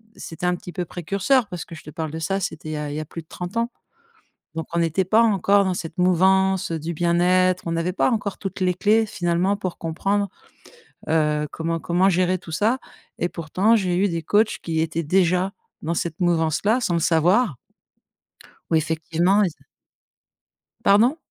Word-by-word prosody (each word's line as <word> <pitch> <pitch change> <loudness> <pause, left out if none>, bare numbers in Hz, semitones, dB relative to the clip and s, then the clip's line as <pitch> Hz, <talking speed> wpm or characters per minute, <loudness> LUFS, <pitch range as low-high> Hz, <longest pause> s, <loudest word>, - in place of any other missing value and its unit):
c'était 165 +2 -7
un 180 - +2
petit 180 -1 -10
peu 180 - -2
précurseur 200 - 0
parce 180 -4 -6
que 165 - -10
je 155 - -12
te 150 - -10
parle 160 0 -4
de 160 - -5
ça, 195 +5 -1
c'était 160 -4 -5
il - - -3
y - - -3
a 150 -1 -4
il - - -5
y - - -2
a 155 - -4
plus 165 - -8
de 160 - -24
30 180 +4 -7
ans. 235 +1 0 0.8
Donc 160 0 -4
on 170 - +2
était 170 +3 0
pas 220 +4 +5
encore 200 -2 +3
dans 190 -1 0
cette 165 -2 -6
mouvance 190 +1 +3
du 165 +1 -3
bien-être, 180 +2 +2
on 165 - -1
avait 165 +2 -1
pas - - +2
encore 205 -4 -2
toutes 195 -1 -6
les 180 -1 +2
clés 215 +4 +3
finalement, 175 +1 0
pour 185 -3 -5
comprendre, 195 +5 -1 0.8
heu, 150 -1 +1
comment 165 0 -3
comment 180 +4 +2
gérer 185 0 +2
tout 165 -2 -11
ça 220 +10 +1 0.4
et 175 - 0
pourtant, 185 +7 +1
j'ai 185 -5 +1
eu 200 +3 +2
des 170 -2 -3
coachs 210 +7 +2
qui 165 -1 -2
étaient 160 +1 -1
déjà 180 +3 +2 0.3
dans 165 +2 -2
cette 170 0 -3
mouvance-là 175 - +2
sans 180 -8 0
le 170 - +1
savoir. 175 - +3 1.1
Où 165 - +3
effectivement 165 +5 +1
ils 190 - +1
a - - -24 1.2
pardon? 230 +9 +5
180 Hz, 195 wpm, -23 LUFS, 165-195 Hz, 1.2 s, pas